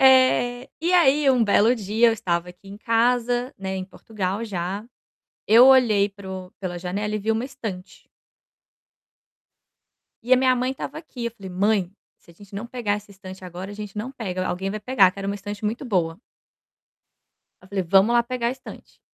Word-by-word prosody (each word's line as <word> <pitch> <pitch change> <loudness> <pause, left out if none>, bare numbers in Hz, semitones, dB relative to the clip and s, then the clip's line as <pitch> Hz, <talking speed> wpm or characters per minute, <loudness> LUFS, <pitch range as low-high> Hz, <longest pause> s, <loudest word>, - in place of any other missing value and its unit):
é. 255 -1 +4
E 345 +2 0
aí, 295 -5 +5
um 250 -2 +3
belo 220 +3 +4
dia, 220 +2 +2
eu 230 - +3
estava 180 -5 -2
aqui 180 +2 -17
em 200 - -9
casa, 240 +3 +1
né, 190 0 -4
em 185 - -4
Portugal 200 +1 -4
já, 195 0 -4 0.6
eu 235 +4 +8
olhei 225 -7 +5
para 195 -1 -11
o 185 -1 -7
pela 180 -2 -4
janela 200 +4 -3
e - - -2
vi 220 +2 0
uma 225 +3 -1
estante 215 -9 -8 2.2
e 245 +3 -1
a - - +9
minha 255 0 +3
mãe 255 +1 -1
estava 270 - -6
aqui, 270 -7 -8
eu - - -2
falei: 200 -4 -11
"Mãe, 195 0 +1 0.3
se - - -21
a - - -18
gente 200 +2 -15
não 205 +4 -5
pegar 235 -4 -2
essa 205 0 -8
estante 190 -1 -11
agora, 180 +2 -7
a - - -8
gente 210 -1 -8
não 225 +5 -4
pega, 185 -7 -4
alguém 190 +2 -2
vai 215 +1 -5
pegar", 205 -6 +4
que 200 - -14
era 195 - -4
uma 200 - -1
estante 205 +1 -7
muito 225 +6 -2
boa. 180 -6 -1 1.4
Eu 185 - -17
falei: 190 -1 -2
"Vamos 195 +6 +4
lá 240 0 +4
pegar 240 -1 -2
a - - 0
estante". 260 +1 -11
210 Hz, 195 wpm, -23 LUFS, 190-245 Hz, 2.2 s, a